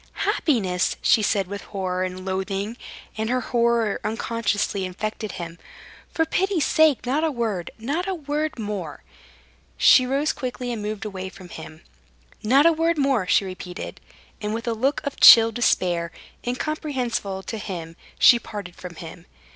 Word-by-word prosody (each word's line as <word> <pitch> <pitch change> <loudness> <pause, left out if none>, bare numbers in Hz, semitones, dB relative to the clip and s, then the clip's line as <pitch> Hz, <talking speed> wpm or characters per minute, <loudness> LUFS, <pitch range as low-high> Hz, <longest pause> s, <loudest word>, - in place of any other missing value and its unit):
"Happiness!" 190 - +1
she 220 - +5
said 200 -1 +1
with 200 +2 -6
horror 185 -2 -2
and 185 0 -5
loathing 195 +3 -3 0.4
and 220 +1 -1
her 255 +1 +1
horror 235 -3 +1
unconsciously 215 -2 -1
infected 215 +3 -4
him. 170 -1 -7 0.5
"For 325 - +1
pity's 360 -1 0
sake, 310 -5 +3
not 280 +6 0
a 325 - +2
word, 225 - -2
not 285 - -2
a 385 - -1
word 300 -1 -3
more." 205 -9 -5 0.7
She 255 - +6
rose 280 +4 +1
quickly 250 -1 -4
and 230 -3 -4
moved 210 0 -4
away 190 -2 -5
from 185 -1 -13
him. 160 -1 -10 0.6
"Not 265 +7 +4
a 335 - +6
word 330 +1 +1
more," 270 -9 +1
she 195 - +3
repeated, 185 -1 -7 0.4
and 210 +1 -2
with 230 +1 -5
a 230 - +1
look 265 +6 0
of 285 - -5
chill 225 -1 +9
despair, 175 -7 +1 0.4
incomprehensible 250 -8 -2
to 220 - -5
him, 170 -5 -6 0.2
she 240 - +7
parted 200 -6 -8
from 180 -2 -9
him. 165 +1 -10
220 Hz, 155 wpm, -23 LUFS, 185-260 Hz, 0.7 s, chill